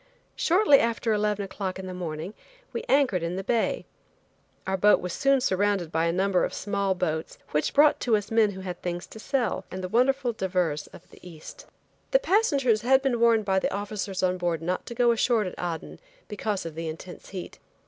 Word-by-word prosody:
Shortly 340 -5 +5
after 230 0 0
eleven 210 -1 0
o'clock 190 -1 -4
in 190 - -7
the 185 - -6
morning 175 +1 -5 0.4
we - - -2
anchored 265 -10 +3
in 170 +2 -2
the 190 - -4
bay. 230 +3 0 0.8
Our 190 - 0
boat 205 +2 +5
was 180 -1 -5
soon 275 -1 +2
surrounded 195 -6 0
by 165 0 +1
a 170 - +2
number 190 +1 +1
of - - -2
small 200 -1 -1
boats, 160 -3 -3
which 150 0 0
brought 295 +1 +5
to 230 -3 +2
us 205 +1 -6
men 225 -2 +4
who 190 - -8
had 180 -2 -6
things 175 0 -4
to 220 - -12
sell, 245 -5 -1
and 185 0 -6
the - - -2
wonderful 250 +3 +2
divers 180 -7 -1
of - - -15
the - - -16
East. 165 -4 -12 0.4
The - - +5
passengers 290 - +2
had 265 +3 +4
been 255 -4 +1
warned 230 -2 +4
by 190 -1 +2
the - - -1
officers 200 -1 -3
on 185 0 +1
board 170 -2 -1
not 180 +2 -2
to 235 - -6
go 240 0 +4
ashore 230 -1 +2
at 185 - -5
Aden 170 -2 -5 0.3
because 210 -2 -3
of 165 - -5
the 165 +1 -5
intense 165 +3 -8
heat. 185 -2 -8
195 Hz, 205 wpm, -26 LUFS, 180-235 Hz, 0.8 s, Shortly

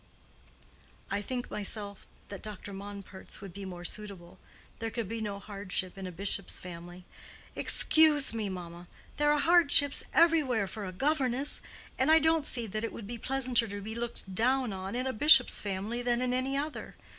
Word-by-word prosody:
"I 200 +1 0
think, 245 +4 -4
myself, 205 -1 -4 0.2
that 200 - -7
Dr. 205 -1 -7
Monpert's 200 -1 -9
would 195 -3 -10
be 200 +1 -7
more 175 -2 -8
suitable. 195 -4 -7 0.4
There 225 0 -2
could 225 -2 -4
be 225 +2 -4
no 205 -2 -3
hardship 195 -2 -3
in 195 -1 -6
a - - -6
bishop's 195 +2 -3
family." 175 0 -10 0.5
"Excuse 305 -5 +4
me, 220 -3 -2
mamma. 175 -1 -8 0.3
There 295 0 +3
are 295 - +3
hardships 295 -3 +5
everywhere 300 -10 +3
for 205 +1 -6
a 185 - -5
governess. 270 - 0 0.4
And 260 +3 +3
I 320 - +8
don't 320 -1 +2
see 240 -3 0
that 215 +1 -4
it 230 - -2
would 225 - -8
be 235 +3 -6
pleasanter 255 -3 0
to 205 0 -6
be 215 +2 -6
looked 235 -4 -4
down 250 +2 +2
on 190 +3 -5
in 250 +1 -1
a 260 - -1
bishop's 300 +8 +6
family 205 +4 -3
than 240 -1 +1
in 250 0 0
any 260 +2 0
other. 300 +2 -5
220 Hz, 180 wpm, -30 LUFS, 195-260 Hz, 0.5 s, I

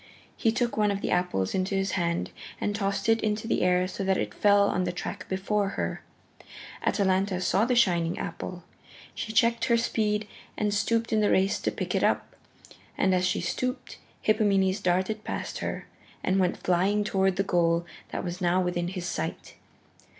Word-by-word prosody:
He 225 - +2
took 240 +1 -1
one 210 -1 +3
of 200 0 -1
the - - -2
apples 180 - 0
into 190 +1 0
his 195 0 0
hand 170 -2 -1 0.3
and 205 - -1
tossed 200 0 -1
it 225 0 +3
into 215 +1 -1
the - - +1
air 180 0 +3
so 190 +2 -5
that 190 0 +2
it - - -2
fell 200 -1 +4
on 185 - 0
the - - -1
track 175 - -6
before 195 +1 0
her. - - -2 0.8
Atalanta 190 -1 +1
saw 190 +3 +2
the 250 0 +1
shining 175 -8 +2
apple. 175 +1 -5 0.5
She 220 - -4
checked 230 +2 +3
her 235 - +3
speed 215 -2 0 0.3
and 210 -1 0
stooped 230 +2 0
in 215 - +3
the 210 - +3
race 190 +1 +2
to - - -1
pick - - -4
it - - +1
up. - - 0 0.6
And 190 -1 +3
as 185 0 +2
she - - 0
stooped 255 +1 -3 0.2
Hippomenes 200 -3 +2
darted 190 +4 0
past - - -4
her, - - -4 0.4
and 190 +1 +2
went 180 -1 +1
flying 190 +4 +1
toward 195 -2 +1
the 195 - +1
goal 170 -2 +2 0.3
that - - -3 0.2
now 175 0 +2
was 185 - +1
within 175 -1 -1
his 180 -1 -5
sight. 175 - -4
195 Hz, 185 wpm, -27 LUFS, 180-210 Hz, 0.8 s, fell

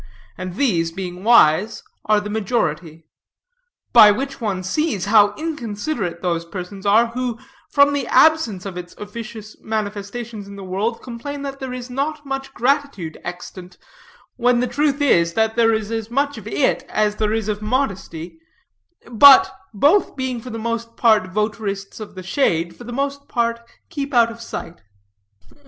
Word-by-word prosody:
And 185 -1 -6
these, 175 -11 +1
being 180 +1 -6
wise, 210 -3 +4 0.2
are 210 -1 +3
the 210 0 -6
majority. 170 -7 -2 0.9
By 215 -3 +9
which 270 +6 -2
one 195 -4 -2
sees 210 - -1
how 205 -1 +5
inconsiderate 235 - -4
those 170 -2 0
persons 190 +3 -7
are, 225 +3 +4
who, 245 -1 -3 0.3
from 285 0 +4
the 280 -4 -2
absence 280 - +3
of 190 -3 -6
its 175 0 -8
officious 215 0 -8
manifestations 215 0 -5
in 200 - -10
the 200 - -9
world, 200 +5 -2
complain 280 +4 -6
that 275 -1 -6
there 265 -2 -5
is 250 0 -7
not 295 +3 -3
much 270 0 -4
gratitude 255 - -1
extant; 180 +1 -8 0.6
when 245 0 +3
the 250 - +1
truth 285 +2 0
is, 170 -11 +3
that 220 0 +1
there 230 -1 +4
is 220 -1 -2
as 225 -1 -3
much 280 +3 0
of - - -12
it - - +1
as 210 -1 0
there 215 -1 0
is 220 -1 -1
of 210 -1 -2
modesty; 195 - -3 0.7
but, 265 +4 +7 0.2
both 295 - +3
being 260 -3 -3
for 250 - -9
the 225 - -5
most 230 0 -4
part 215 -5 +3
votarists 205 -1 -3
of 215 -2 -9
the 185 - -8
shade, 170 - 0
for 240 - -12
the 240 - -7
most 280 +2 -3
part 235 -1 0 0.3
keep 285 -4 -4
out 235 -1 +5
of 230 0 -11
sight. 175 -6 -7
220 Hz, 165 wpm, -20 LUFS, 195-255 Hz, 0.9 s, By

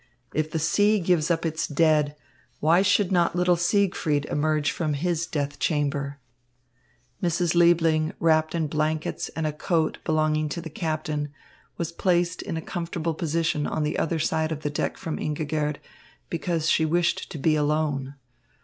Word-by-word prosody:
If 155 0 0
the 160 - -2
sea 205 +7 +3
gives 170 -3 +1
up 170 -1 +1
its 160 -1 -1
dead, 150 -1 +2 0.4
why 165 +4 +4
should 200 0 +3
not 175 -2 +2
little 180 0 +3
Siegfried 175 -5 +1
emerge 150 0 +1
from 155 -4 -1
his 170 +2 -1
death 145 -3 -3
chamber? 145 -2 -1 1.0
Mrs. 175 -1 +1
Liebling, 165 -2 +4
wrapped 160 0 +2
in 165 -2 0
blankets 155 +1 -1
and 160 - -2
a 155 - -1
coat 160 +1 0
belonging 155 -1 +1
to 170 - -4
the 165 -2 -7
captain, 155 -2 -2 0.5
was 170 -1 -3
placed 175 0 +1
in 165 - -4
a 160 - -5
comfortable 170 -2 -3
position 160 -2 -1
on 155 - -1
the 150 - -1
other 165 0 0
side 160 0 0
of 155 -1 -3
the 145 - -1
deck 145 - -2
from 160 - -4
Ingigerd, 150 0 -1 0.6
because 165 -1 -1
she 160 - +3
wished 170 +2 +1
to - - -5
be 155 +2 +2
alone. 145 -2 0
160 Hz, 160 wpm, -25 LUFS, 150-170 Hz, 1.0 s, why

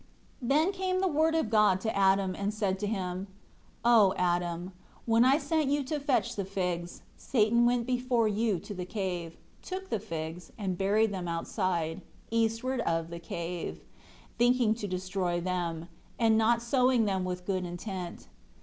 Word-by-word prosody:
8 - - -3
Then 310 +7 +4
came 375 -1 -1
the 380 - +2
Word 320 0 +2
of 285 -9 0
God 210 -4 +4
to 220 - -2
Adam, 195 -1 +3
and 200 +2 -2
said 200 -3 -1
to 205 - -2
him, 190 -2 -3 0.6
"O 220 -5 +6
Adam, 175 0 0 0.3
when 230 0 +4
I 265 +3 +5
sent 315 -2 0
you 285 0 +1
to 295 +3 -2
fetch 260 -4 0
the 200 - -2
figs, 180 -3 -3
Satan 235 0 +3
went 240 -1 +1
before 250 -2 +1
you 215 -1 +1
to 205 - -7
the 185 -2 -4
cave, 180 -4 -4 0.2
took 380 0 -6
the - - +1
figs, 165 0 -6
and 190 -4 -2
buried 205 +3 +2
them 180 -2 -4
outside, 170 0 -1 0.3
eastward 230 +3 0
of 165 -4 -1
the 170 - -6
cave, 170 +1 -5 0.6
thinking 245 -2 +4
to 220 -2 -5
destroy 185 -1 -2
them; 170 -2 -2 0.3
and 225 -2 +4
not 230 +1 +3
sowing 250 -1 +3
them 190 -2 0
with 180 0 -4
good 185 -1 -1
intent. 175 0 -6
200 Hz, 170 wpm, -30 LUFS, 180-240 Hz, 0.6 s, O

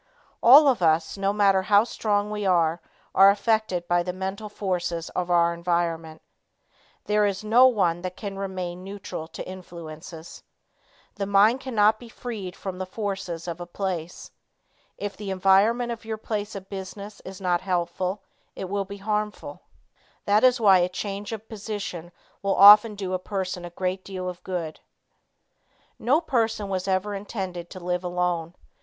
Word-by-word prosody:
All 280 +5 +9
of 255 -8 +2
us 160 -1 +2
no 195 0 0
matter 200 -2 +3
how 205 +2 +4
strong 210 -3 -1
we 210 -1 -3
are, 170 -3 +2 0.3
are 195 +1 +8
affected 205 -4 +1
by 175 0 +2
the 180 +1 -3
mental 190 +3 -5
forces 175 -5 -3
of 180 -1 -3
our 170 -1 +3
environment. 170 -2 -2 0.8
There 210 0 +3
is 200 +1 -3
no 235 +4 +6
one 180 -8 +1
that 185 0 -6
can 200 -2 -6
remain 185 -2 -5
neutral 195 -4 -7
to 165 - -8
influences. 170 -3 -10 0.8
The 200 -1 -2
mind 205 +5 +4
cannot 220 -4 +2
be 240 - -12
freed 215 -7 -6
from 190 -2 -6
the 185 - -4
forces 190 -5 -4
of 170 0 -5
a 175 - -6
place. 175 -2 -5 0.7
If 205 -1 -5
the 205 -2 -7
environment 195 +6 +3
of 230 -1 -6
your 220 -1 -4
place 210 -1 -4
of 195 -1 -8
business 200 +1 -8
is 190 0 -9
not 180 -2 0
helpful, 185 +1 -2 0.3
it 190 - -6
will 200 -1 -1
be 200 +1 -8
harmful. 210 +1 -3 0.6
That 205 +3 +3
is 255 0 +5
why 195 -4 +6
a 175 0 +1
change 200 +2 -5
of 220 0 -7
position 200 -6 -6 0.3
will 200 -1 0
often 210 +2 +9
do 190 -2 -4
a 185 - 0
person 185 -2 -4
a - - -6
great 185 +2 -3
deal 185 -2 -6
of 180 -1 -7
good. 170 -4 -4 1.2
No 265 +7 +3
person 225 - -1
was 185 -1 -2
ever 190 +2 0
intended 190 -4 -5
to 185 - -9
live 180 0 -2
alone. 175 -1 -2
195 Hz, 165 wpm, -25 LUFS, 180-210 Hz, 1.2 s, All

